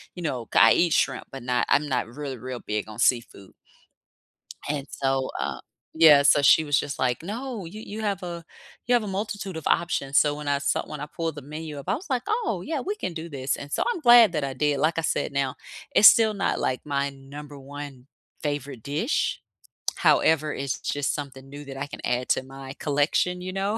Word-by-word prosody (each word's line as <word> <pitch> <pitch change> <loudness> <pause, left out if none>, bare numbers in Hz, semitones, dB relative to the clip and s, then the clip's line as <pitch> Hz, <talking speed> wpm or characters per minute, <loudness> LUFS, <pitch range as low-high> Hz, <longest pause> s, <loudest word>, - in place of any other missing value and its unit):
you 180 - -7
know, 125 -7 -3
c - - +5
I 115 +2 +8
eat 170 -2 +2
shrimp, - - 0
but 135 -2 -8
not 125 0 +1
I'm 150 +1 +3
not 125 -3 0
really 135 +1 -6
real 125 +1 -6
big 105 0 -3
on 110 +2 -10
seafood. 115 -6 0 1.1
And 145 -1 -3
so, 135 -1 -1
uh, - - -3 0.3
yeah. 155 -3 +7
So 145 0 +5
she 160 - +6
was 145 -2 +2
just 140 - -5
like, 125 +4 0
"No. 225 0 -5
You 210 +6 -9
you 215 +1 -7
have 200 -3 -1
a 170 -1 -6 0.4
you 245 - +2
have 240 -3 +3
a - - -5
multitude 195 -2 -4
of 160 - -8
options." 140 -5 +1
So 145 -1 +2
when 150 -1 -7
I 140 0 +1
saw 140 - 0
when 150 -2 -7
I 150 - -5
pulled 165 -1 -4
the 145 - -7
menu 150 +1 -7
up, - - -7
I - - +2
was 330 +1 -9
like, 255 -2 0
"Oh, 430 - -1
yeah. 310 -3 -2
We 410 +3 -3
can 185 - -4
do 165 +1 -6
this," 135 -2 -2
and 145 0 -9
so - - +1
I'm 355 - -4
glad 240 -5 +8
that 150 -2 -1
I 135 -1 -3
did. 145 -1 0
Like 160 +3 +1
I - - +1
said 155 - -1
now, 140 -1 -1 0.4
it's 215 - +10
still 220 -2 +6
not, 195 - -1
like, 130 - -1
my 140 -1 -1
number 140 +2 -11
1 140 -1 -9 0.4
favorite 145 -5 -4
dish. 155 - -1 0.5
However, 155 -1 +3
it's 135 -2 -3
just 145 -1 -1
something 135 -2 -8
new 145 +1 -9
that 135 -1 -8
I 140 +1 -4
can - - -9
add 125 +1 -1
to - - +2
my 135 0 -9
collection, 155 +5 +1
you 185 0 -5
know, 200 +3 -1
145 Hz, 220 wpm, -25 LUFS, 135-180 Hz, 1.1 s, it's